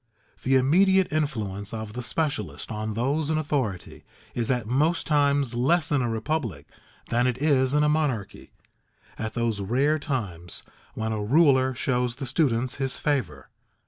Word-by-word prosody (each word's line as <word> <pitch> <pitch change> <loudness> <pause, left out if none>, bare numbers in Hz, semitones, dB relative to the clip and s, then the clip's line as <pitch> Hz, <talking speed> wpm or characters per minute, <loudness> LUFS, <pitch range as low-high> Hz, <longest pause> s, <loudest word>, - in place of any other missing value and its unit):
The 135 +1 +2
immediate 185 +8 +4
influence 110 -9 -2
of 110 -1 -6
the 125 - -4
specialist 145 +2 -2
on 110 0 -3
those 140 +6 0
in 160 - +1
authority 135 - -3 0.3
is 120 -2 -1
at 125 -4 0
most 150 +9 +1
times 145 -4 +2
less 155 +7 +2
in 145 -2 +2
a 120 - 0
republic 115 - -2 0.4
than 120 +2 +2
it 125 0 -1
is 140 -2 +2
in 150 - +4
a - - +3
monarchy, 150 -9 -1 0.7
at 110 -1 -4
those 115 -3 0
rare 135 +10 +1
times 100 - -4 0.3
when 110 0 -2
a 105 -1 -2
ruler 130 0 +4
shows 125 -1 0
the 135 - -5
students 130 -3 0
his 135 -2 -1
favor. 140 - -2
130 Hz, 155 wpm, -26 LUFS, 115-150 Hz, 0.7 s, immediate